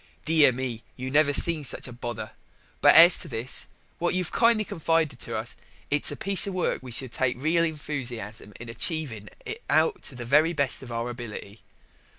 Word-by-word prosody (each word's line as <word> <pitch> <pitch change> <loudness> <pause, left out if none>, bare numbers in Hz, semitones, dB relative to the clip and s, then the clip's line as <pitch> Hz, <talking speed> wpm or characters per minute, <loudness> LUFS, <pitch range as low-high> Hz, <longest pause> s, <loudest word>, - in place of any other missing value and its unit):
Dear 155 -4 +5
me, 125 -2 -5 0.2
you 130 +1 -5
never 145 0 +4
see 160 +2 +5
such 135 - -1
a 125 - -9
pother. 120 -2 -6 0.5
But - - +6
as 170 +1 +8
to - - -5
this, 115 +1 0 0.3
what 175 +1 +1
you've 180 -3 -2
kindly 230 -2 +3
confided 165 -3 -1
to - - -5
us, - - -6 0.4
it's 145 0 +2
a - - -5
piece 195 +5 0
of 195 - -4
work 180 - -1
we 130 - -10
shall 120 +3 -1
take 125 +1 -1
a - - -15
reel 165 +4 +1
enthusiasm 125 -10 -4
in 120 - -9
achieving 115 - -3 0.2
it 445 +2 -6
out 440 -3 +2
to 135 - -3
the 120 -1 -7
very 150 +7 +3
best 140 -4 -1
of 125 -3 -10
our 115 +1 -3
ability. 110 -3 -9
135 Hz, 195 wpm, -26 LUFS, 120-165 Hz, 0.5 s, as